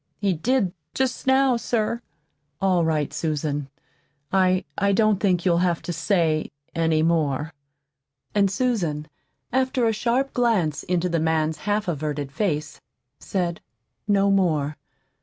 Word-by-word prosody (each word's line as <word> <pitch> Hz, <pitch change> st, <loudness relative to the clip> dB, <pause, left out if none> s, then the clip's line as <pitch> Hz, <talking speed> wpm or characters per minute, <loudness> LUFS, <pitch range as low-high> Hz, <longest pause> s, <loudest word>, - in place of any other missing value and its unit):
"He 200 Hz, -2 st, +1 dB
did, 195 Hz, +2 st, +1 dB, 0.2 s
jest 260 Hz, -1 st, -1 dB
now, 265 Hz, -1 st, +4 dB
sir." 230 Hz, 0 st, -1 dB, 0.6 s
"All 185 Hz, -3 st, +2 dB
right, 155 Hz, -3 st, 0 dB
Susan. 145 Hz, -2 st, -2 dB, 0.6 s
I 185 Hz, -1 st, +3 dB
I 200 Hz, -1 st, +2 dB
don't 215 Hz, -1 st, +3 dB
think 180 Hz, -4 st, +1 dB
you'll 170 Hz, -2 st, +3 dB
have 175 Hz, -2 st, +1 dB
to 175 Hz, -, -3 dB
say 165 Hz, -4 st, +1 dB, 0.2 s
any 160 Hz, -1 st, +2 dB
more." 155 Hz, -2 st, 0 dB, 0.8 s
And 200 Hz, -2 st, +3 dB
Susan, 185 Hz, -9 st, -1 dB, 0.5 s
after 260 Hz, -1 st, +1 dB
a 225 Hz, -, +2 dB
sharp 245 Hz, +5 st, 0 dB
glance 210 Hz, -11 st, +1 dB
into 180 Hz, 0 st, 0 dB
the 170 Hz, -2 st, 0 dB
man's 160 Hz, -1 st, 0 dB
half 205 Hz, 0 st, +1 dB
averted 150 Hz, -3 st, -3 dB
face, 150 Hz, -4 st, -2 dB, 0.4 s
said 175 Hz, -3 st, -2 dB, 0.5 s
no 200 Hz, -1 st, +3 dB
more. 155 Hz, -7 st, +1 dB
180 Hz, 130 wpm, -24 LUFS, 155-215 Hz, 0.8 s, now